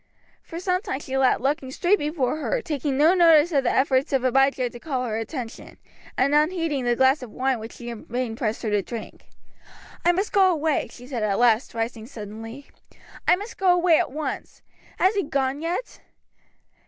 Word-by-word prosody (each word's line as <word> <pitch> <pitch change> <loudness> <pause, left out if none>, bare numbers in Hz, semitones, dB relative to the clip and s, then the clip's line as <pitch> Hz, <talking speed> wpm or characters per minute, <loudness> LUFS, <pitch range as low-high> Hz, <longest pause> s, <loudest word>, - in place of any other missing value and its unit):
For 330 - -8
some 365 0 0
time 265 - -4
she 270 - -11
sat 265 -1 +3
looking 275 -1 -1
straight 355 +9 +1
before 295 -2 -1
her, - - -1
taking 285 -3 -2
no 310 +5 +5
notice 335 -2 +5
of 280 -4 +2
the 245 - +1
efforts 265 0 +2
of 270 -2 +1
Abijah 265 0 +2
to 240 - -10
call 260 -3 -3
her 220 -3 -3
attention, 235 0 -7 0.4
and 275 +3 +2
unheeding 305 -3 +1
the 240 0 +2
glass 265 +3 +3
of 250 - -8
wine 260 +2 -1
which 220 +1 -8
she 240 -1 -8
in 230 - -9
vain 240 -1 -3
pressed 225 0 -3
her 220 - -1
to 205 -1 +2
drink. 230 +3 -9 0.8
"I 350 - +5
must 380 +4 -2
go 385 -2 +5
away," 315 -3 0
she 245 - -13
said 250 -3 -4
at 205 -2 0
last, 235 0 +2
rising 225 -1 -3
suddenly. 225 +2 -9 0.6
"I - - +6
must 410 +5 -9
go 380 -2 +4
away 350 -2 +4
at - - -1
once. 305 +2 -5 0.3
Has 380 +3 +3
he 405 - +1
gone 280 -3 -1
yet?" 345 +9 -4
270 Hz, 195 wpm, -24 LUFS, 240-325 Hz, 0.8 s, I